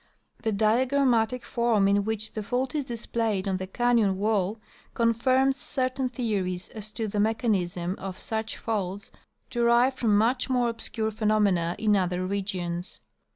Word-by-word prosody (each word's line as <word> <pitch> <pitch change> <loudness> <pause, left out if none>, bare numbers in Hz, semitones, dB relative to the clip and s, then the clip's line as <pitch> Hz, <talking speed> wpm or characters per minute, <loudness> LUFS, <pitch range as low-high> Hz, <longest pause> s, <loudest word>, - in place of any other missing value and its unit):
The 220 - 0
diagramatic 245 +2 +2
form 235 -4 +2
in 200 0 +3
which 220 0 -2
the 215 - -3
fault 250 +5 -2
is 295 -3 -1
displayed 225 -4 -2
on 190 -1 0
the 185 0 -5
canyon 230 -2 +2
wall 210 0 0 0.4
confirms 255 +4 +2
cer 260 -3 -1
tain 255 0 -2
theories 195 -7 -2
as 215 -1 -8
to 220 0 -2
the 205 0 -2
mechanism 190 -5 0
of 190 -1 -6
such 220 0 -3
faults 200 -3 -3 0.4
derived 240 +2 +3
from 215 -4 +3
much 245 +5 +1
more 245 -2 +2
obscure 220 -1 -3
phenomena 210 -6 +1
in 210 -1 +2
other 185 -1 0
regions. 185 -2 -3
220 Hz, 150 wpm, -27 LUFS, 195-240 Hz, 0.4 s, in